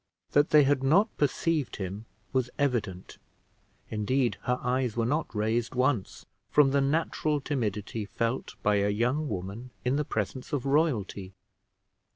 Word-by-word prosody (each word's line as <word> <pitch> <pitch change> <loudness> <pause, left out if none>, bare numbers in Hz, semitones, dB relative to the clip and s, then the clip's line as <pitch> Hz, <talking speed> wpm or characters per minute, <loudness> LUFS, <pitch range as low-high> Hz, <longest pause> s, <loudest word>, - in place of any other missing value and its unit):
That 145 +1 +4
they 150 -1 +7
had 140 -1 +2
not 180 +11 +3
perceived 150 0 0
him 100 +3 -5 0.3
was 130 -2 +1
evident; 115 -10 -2 0.7
indeed 120 +4 0
her 125 0 +1
eyes 125 -2 0
were 115 - +2
not 150 +6 0
raised 110 +3 0
once, 125 -5 0 0.2
from 145 -2 +5
the 140 0 +3
natural 150 +1 0
timidity 110 -6 -2
felt 115 +4 -2
by 105 0 +3
a 100 0 +2
young 125 +8 0
woman 100 +6 -5 0.2
in 130 +3 +2
the 150 - +1
presence 125 - -4
of 140 -3 -1
royalty. 120 - 0
125 Hz, 145 wpm, -28 LUFS, 105-145 Hz, 0.7 s, they